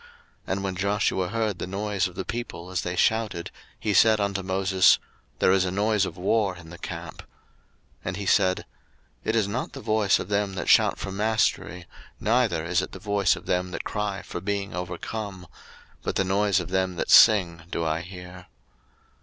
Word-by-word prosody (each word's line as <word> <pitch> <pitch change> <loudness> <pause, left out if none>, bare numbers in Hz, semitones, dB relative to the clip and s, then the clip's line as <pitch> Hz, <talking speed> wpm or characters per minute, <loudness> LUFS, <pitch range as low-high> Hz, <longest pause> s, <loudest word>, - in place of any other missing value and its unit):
02:032:017 480 - -20 0.4
And 100 +1 -3
when 95 -1 -2
Joshua 95 -1 0
heard 110 -1 -2
the - - -4
noise 100 0 -1
of 90 - -12
the 95 - -4
people 105 -7 -6
as 90 - -1
they 90 0 -3
shouted, 105 -3 0 0.3
he 105 - -1
said 110 +1 +5
unto 100 -1 -1
Moses, 95 -1 +4 0.4
There - - +3
is 95 -1 +4
a 95 - -1
noise 105 +1 +1
of - - -9
war 100 +1 +1
in 80 -1 -12
the 85 - -11
camp. - - -7
02:032:018 - - -12 0.8
And 90 +1 -3
he 100 - -5
said, 95 0 +2 0.6
It 110 - 0
is 110 -3 +2
not 115 +6 -3
the 140 - -7
voice 110 -5 +2
of - - -6
them 100 -1 0
that 90 - -3
shout - - +5
for 95 - -5
mastery, 105 -3 0 0.3
neither 110 -7 +1
is 90 +1 +1
it - - -7
the - - -6
voice 100 0 +1
of 90 -1 -11
them 90 0 0
that - - -5
cry 105 -2 -3
for - - -6
being 100 0 -3
overcome: 90 +2 -5 0.6
but - - -3
the - - +2
noise 100 +1 +2
of - - -5
them 95 -1 0
that - - -2
sing 90 -6 +6
do 85 - -2
I 80 +1 0
hear. 90 0 -10
95 Hz, 195 wpm, -25 LUFS, 90-105 Hz, 0.8 s, sing